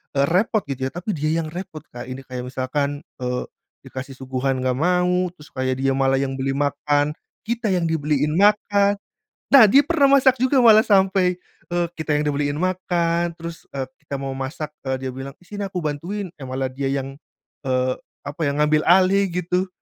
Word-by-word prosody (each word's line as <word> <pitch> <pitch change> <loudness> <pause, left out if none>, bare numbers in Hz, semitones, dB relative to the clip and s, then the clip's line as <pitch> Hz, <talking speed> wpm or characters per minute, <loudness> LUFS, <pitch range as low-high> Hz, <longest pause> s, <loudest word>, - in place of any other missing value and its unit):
eee, 140 0 +4
repot 205 +5 +2
gitu 130 -1 -2
ya. - - -23
Tapi 180 +5 -3
dia 155 +2 0
yang 155 - -5
repot, 175 -3 -7
Kak. 120 0 -7
Ini 130 +1 -6
kayak 125 -1 -6
misalkan, 140 +2 -2 0.2
eee, 125 0 -1 0.4
dikasih 135 +1 -7
suguhan 130 0 -2
nggak 130 0 0
mau. 180 +2 +2
Terus 150 - -15
kayak 130 0 -1
dia 135 - +2
malah 135 0 +2
yang 135 -1 -2
beli 135 +1 0
makan, 145 +1 +1 0.3
kita 230 -1 -1
yang 175 -2 +1
dibeliin 150 -1 0
makan. 205 0 +3 0.6
Nah, 270 -5 +10
dia 270 +7 +7
pernah 290 -4 +3
masak 260 0 +4
juga. 260 +1 +3
Malah 220 -2 +7
sampai, 190 -3 +3 0.4
eee, 175 0 +1
kita 155 -2 0
yang 150 - 0
dibeliin 145 0 -1
makan. 175 -2 0
Terus, 165 0 -8
eee, 135 -1 -2 0.2
kita 140 - -4
mau 135 0 -4
masak, 145 +3 -5 0.2
eee, 130 0 -2
dia - - -3
bilang, 135 +1 -7
“Ih, - - -21
sini 205 0 -3
aku 185 -2 -4
bantuin.” 175 +6 -3
Eh 135 - -6
malah 130 +1 -2
dia 135 0 -2
yang, 135 0 -2 0.5
eee, 130 -1 +1 0.3
apa 145 +4 -8
ya, 140 - +1
ngambil 150 +1 +3
alih 190 +2 +5
gitu. 180 +2 -1
150 Hz, 190 wpm, -22 LUFS, 135-185 Hz, 0.6 s, Nah